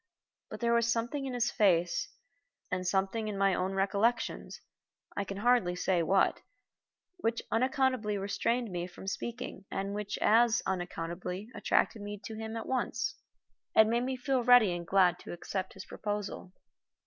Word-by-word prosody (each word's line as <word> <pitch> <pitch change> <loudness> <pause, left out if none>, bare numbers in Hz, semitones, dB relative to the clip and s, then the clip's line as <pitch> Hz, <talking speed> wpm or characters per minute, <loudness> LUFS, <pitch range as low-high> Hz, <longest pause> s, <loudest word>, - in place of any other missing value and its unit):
But - - -8
there 235 0 +2
was 235 0 +3
something 240 +5 -1
in 255 - -4
his 245 0 +1
face, 175 -5 +2 0.6
and 185 0 -1
something 195 +4 0
in 205 -2 -3
my 195 -1 +3
own 185 +1 -1
recollections 200 +5 0 0.6
I 200 - 0
can 195 0 -6
hardly 220 -5 +3
say 180 -1 +1
what 190 +4 +2 0.8
which 235 -8 -1
unaccountably 255 -3 +1
restrained 230 +3 -1
me 175 0 -3
from 180 +1 -12
speaking 235 0 -5
and 195 +1 -3
which 205 0 -3
as 235 +1 +4
unaccountably 180 +2 -4
attracted 225 - +1
me 205 0 -6
to 225 - -6
him 220 +1 -5
at 225 - -5
once, 250 -2 -1 0.6
and 220 0 +6
made 235 +1 +2
me 260 +1 -1
feel 255 -1 0
ready 240 -6 +6
and 170 -1 -6
glad 180 -2 +4
to - - -8
accept 185 +2 -4
his 190 - -9
proposal. 205 -3 -4
210 Hz, 160 wpm, -31 LUFS, 190-235 Hz, 0.8 s, and